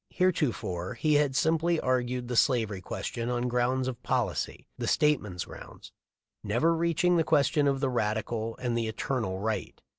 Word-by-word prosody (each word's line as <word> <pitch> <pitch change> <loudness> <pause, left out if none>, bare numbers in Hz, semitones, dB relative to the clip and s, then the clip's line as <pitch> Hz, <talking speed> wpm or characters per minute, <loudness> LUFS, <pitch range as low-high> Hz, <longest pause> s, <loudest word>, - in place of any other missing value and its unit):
Heretofore 115 - 0
he 155 -1 +1
had 145 -2 +3
simply 165 +3 +2
argued 125 -1 -1
the 125 - -3
slavery 110 -6 +2
question 115 +5 -4
on 125 0 0
grounds 125 +1 +1
of 125 -3 -4
policy, - - -1
— - - -46
the - - -2
stateman's 105 -12 +1
grounds, - - -12 0.3
— - - -64 0.2
never 120 +11 +2
reach 170 0 0
ing 180 0 +4
the 165 - +3
question 145 -1 +3
of 135 -1 +1
the 135 - +1
radical 110 0 -2
and 120 -2 -2
the 115 -1 0
eternal 110 -3 -2
right. 105 -1 -3
125 Hz, 175 wpm, -28 LUFS, 110-150 Hz, 0.3 s, ing